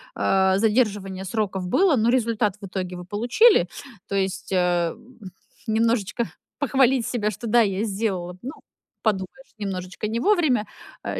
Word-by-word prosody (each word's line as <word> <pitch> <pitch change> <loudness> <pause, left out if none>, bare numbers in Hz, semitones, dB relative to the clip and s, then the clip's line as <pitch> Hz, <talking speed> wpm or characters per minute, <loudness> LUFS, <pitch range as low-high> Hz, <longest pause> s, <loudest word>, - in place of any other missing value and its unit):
а, 190 0 +2
задерживание 205 -4 0
сроков 190 -2 -2
было, 325 - +3
но 225 +2 +2
результат 230 -5 +1
в - - -6
итоге 185 -1 -4
вы 180 - -7
получили. 235 - +4 0.4
То 200 - -3
есть, 195 +1 -2
э, 175 -2 +2
м, 245 0 -19 0.5
немножечко 225 0 +1 0.3
похвалить 265 -3 +3
себя, 215 -4 -1
что 225 +4 -8
да, 240 +2 +4
я 200 0 0
сделала. 195 -4 -2
Ну, 260 - -5 0.5
подумаешь, 215 +5 -3
немножечко 190 0 -4
не 225 +2 -2
вовремя, 275 - +2 0.4
а, - - -3
210 Hz, 145 wpm, -24 LUFS, 190-235 Hz, 0.5 s, получили